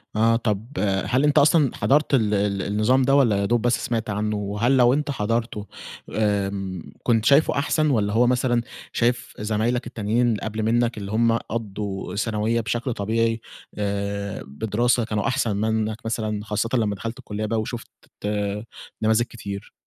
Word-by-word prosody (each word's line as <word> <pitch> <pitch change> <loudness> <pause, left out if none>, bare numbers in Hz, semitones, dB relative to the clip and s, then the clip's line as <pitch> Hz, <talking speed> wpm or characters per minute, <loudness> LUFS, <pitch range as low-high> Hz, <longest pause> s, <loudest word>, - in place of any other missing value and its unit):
آه 115 +1 +4
طب 110 -2 -1 0.4
هل 130 +3 +1
أنت 150 -1 +3
أصلًا 145 -2 +4
حضرت 150 +2 +2
ال 110 -5 +3
ال 100 -1 +1
النظام 105 +7 +2
ده، 135 +2 +3
والّا 120 -8 +4
يادوب 110 +4 +1
بس 120 +1 +1
سمعت 115 -2 -2
عنّه؟ 105 +1 -1
وهل 105 +6 +1
لو 125 0 +5
أنت 150 0 0
حضرته 115 -3 -2 0.4
آمم، 100 -4 -2
كنت 115 -2 +2
شايفه 140 +5 +5
أحسن، 155 +1 +1
والّا 105 -6 +1
هو 120 +2 +4
مثلًا 125 -1 +2 0.3
شايف 120 +1 0
زمايلك 110 +3 0
التانيين 115 0 0
قبل 110 +1 -3
منّك 120 +1 +1
اللي 100 -1 -5
هم 115 +1 +3
قضّوا 100 -5 -5
ثانوية 110 +2 0
بشكل 120 +3 -2
طبيعي 115 +2 0 0.4
آآ، 100 -1 -3
بدراسة 110 - +1
كانوا 105 -2 -1
أحسن 110 -4 0
منّك 110 0 0
مثلًا، 110 -2 -2
خاصة 105 +2 -1
لمّا 110 -5 +1
دخلت 115 +4 -6
الكلية 105 +1 -4
بقى 110 +1 0
وشُفت 120 +2 -6 1.1
نماذج 110 +2 +3
كتير؟ 100 -3 -7
110 Hz, 155 wpm, -23 LUFS, 105-120 Hz, 1.1 s, لو